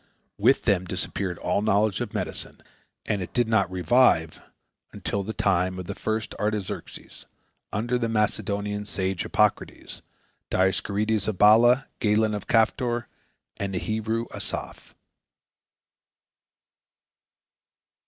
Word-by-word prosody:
With - - +4
them 95 -2 +2
disappeared 90 0 -3
all 90 +3 0
knowledge 105 -1 +2
of - - -3
medicine, - - -4 0.4
and 100 -2 -1
it 90 - -7
did 120 -2 +2
not 110 -5 +2
revive 95 -3 +3 0.5
until 100 - -3
the 100 +3 -4
time 95 -3 +1
of 90 - -6
the 100 - -4
first 110 +2 -3
Artaxerxes, 105 -2 -4 0.4
under 120 +4 -1
the 115 -1 -1
Macedonian 105 -1 -1
sage 95 -3 -2
Hippocrates, - - -1 0.5
Dioscorides 100 +3 +1
of 110 -4 -2
Baala, 120 +6 +6
Galen 105 0 +2
of 105 - -5
Caphtor, 120 +1 +1 0.5
and 100 -1 -3
the - - 0
Hebrew 110 +3 -2
Asaph. - - -6
105 Hz, 115 wpm, -25 LUFS, 95-110 Hz, 0.5 s, Baala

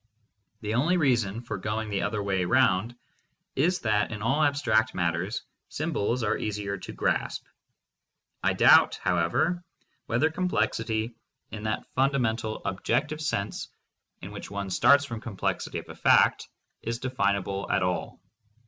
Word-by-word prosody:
The 105 0 -2
only 155 +10 +2
reason 120 - +1
for 115 - -5
going 110 +1 -3
the 100 - 0
other 105 -2 -1
way 95 -2 0
round 115 +1 +2 0.6
is 175 +7 +2
that 105 -1 +1
in 105 -1 -5
all 135 +7 +2
abstract 120 -7 +2
matters 90 +6 -1 0.3
symbols 135 -6 -1
are 105 - +1
easier 100 -2 -3
to - - -8
grasp. - - -1 1.0
I - - +2
doubt, - - +6
however, 90 - 0 0.4
whether 130 +7 +2
complexity, 115 -10 -1 0.4
in 105 - -6
that 105 0 -2
fundamental 120 -5 0
objec 115 +9 0
tive 155 +1 -5
sense 105 -9 -2 0.6
in - - -7
which - - -8
one 100 -1 -4
starts 140 +8 +5
from 115 -5 -6
complexity 105 -6 -3
of - - -7
a - - -8
fact, - - +4 0.3
is 115 0 -3
definable 100 -6 -1
at 95 - +2
all. 90 0 -2
110 Hz, 140 wpm, -27 LUFS, 100-130 Hz, 1.0 s, doubt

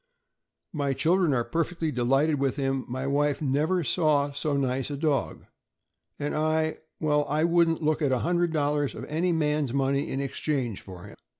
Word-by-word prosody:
"My 140 -3 0
children 170 +3 +2
are 120 - +1
perfectly 165 -1 -1
delighted 135 +4 +2
with 135 -2 0
him; 135 -2 -1
my 130 +2 -4
wife 145 +1 +1
'never 155 +5 +1
saw 145 +3 +2
so 145 0 -1
nice 130 -1 -1
a 145 - -4
dog,' 150 -2 -1 0.7
and 145 0 -3
I— 155 0 0 0.2
well, 150 -1 +2
I 150 +2 +1
wouldn't 170 -1 +2
look 155 +1 +1
at 145 -3 +2
$100 150 0 0
of - - -6
any 170 +4 0
man' 150 -2 +1
s 125 - -5
money 140 0 0
in 135 - -2
exchange 135 -4 -2
for 90 -2 -11
him. 105 - -12
145 Hz, 170 wpm, -27 LUFS, 135-155 Hz, 0.7 s, children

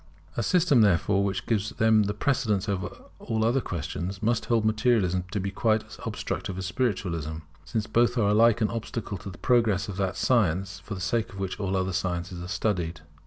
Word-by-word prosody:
A - - 0
system 160 - +4
therefore 100 0 +3
which 100 -1 -2
gives 105 -2 0
them 110 -1 +3
the 105 +1 -2
precedence 105 -5 0
over 100 -2 -1 0.3
all 110 -1 -1
other 125 +4 +2
questions 90 +3 -4
must 115 +1 +1
hold 115 -2 +2
Materialism 110 -5 +2
to 100 - -2
be 100 +1 -2
quite 110 +2 +1
as - - -13
obstructive 95 - -4
as 95 - -3
Spiritualism, 90 - -1 0.3
since 110 -4 -2
both 120 +2 +2
are 105 -3 +3
alike 115 +2 +4
an 110 - +2
obstacle 115 -3 -4
to 100 - -7
the 90 - -10
progress 115 -7 +2
of 100 -3 -6
that 95 -2 -1
science 95 -4 +1
for 95 +4 -7
the 90 - -7
sake 115 +5 0
of - - -10
which 95 0 -4
all 95 -2 0
other 95 0 -1
sciences 90 -1 -2
are 90 - -6
studied. 90 -3 -1
100 Hz, 200 wpm, -27 LUFS, 95-115 Hz, 0.3 s, system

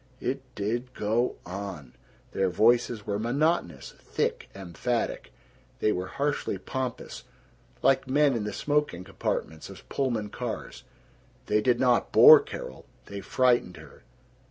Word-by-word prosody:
It 135 +2 -2
did 120 +5 -3
go 110 +4 0
on! 95 -6 -7 0.4
Their 95 -1 +1
voices 115 +2 +2
were 100 0 -2
monotonous, 135 - -1
thick, - - -3
emphatic. 95 +6 -3 0.5
They 105 - +1
were 90 -2 -3
harshly 140 -2 -2
pompous, 125 +5 -5 0.6
like 135 0 +3
men 145 +1 +3
in 115 -3 -2
the 105 - -3
smoking 145 -12 -1
compartments 80 -2 -4
of 95 - -13
Pullman 115 -6 -2
cars. 120 -3 -6 0.6
They 105 0 +2
did 120 +2 +2
not 125 -2 +2
bore - - +10
Carol. 65 - -8 0.2
They 100 0 -7
frightened 120 -4 +1
her. - - -14
115 Hz, 130 wpm, -27 LUFS, 100-130 Hz, 0.6 s, bore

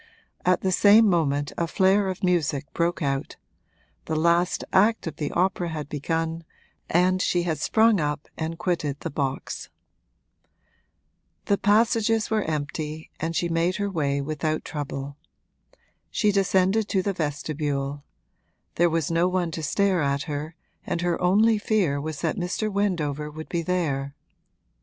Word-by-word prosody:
At 180 0 +2
the 190 - 0
same 215 +4 +6
moment 145 -6 +1
a 170 - 0
flare 190 +3 +3
of 185 0 -5
music 160 -6 +1
broke 170 -1 0
out: 135 -1 -2 0.7
the 160 - -2
last 170 +3 +2
act 215 +4 +4
of 160 -3 -5
the 150 -2 -2
opera 180 -1 0
had 150 -3 -5
begun 165 +3 -2 0.5
and 185 +2 +3
she 175 -1 +1
had 160 -4 -2
sprung 220 +4 +3
up 150 -1 -2
and 160 +1 -4
quitted 155 -6 -1
the - - -4
box. 135 -1 -3 1.8
The 200 - +1
passages 225 +2 +2
were 220 -1 +2
empty 155 -1 -4
and 165 +1 -2
she 175 - +1
made 170 +2 +1
her 200 -1 -2
way 140 -5 0
without 155 +2 -2
trouble. 140 -1 -5 0.9
She 210 -2 +2
descended 195 +2 +2
to 190 -4 0
the 200 - -1
vestibule; 145 -3 -3 0.7
there 175 +1 +4
was 165 -2 -1
no 165 +2 +3
one 180 -2 0
to 160 - -4
stare 190 +3 +1
at 140 0 0
her 150 +2 -5 0.3
and 170 - -2
her 175 0 0
only 210 +5 +4
fear 190 -10 +1
was 155 -1 -5
that - - -1
Mr. 195 +4 -2
Wendover 155 -7 -1
would 155 +1 -9
be 170 - -1
there. 150 -6 -1
165 Hz, 150 wpm, -25 LUFS, 150-190 Hz, 1.8 s, same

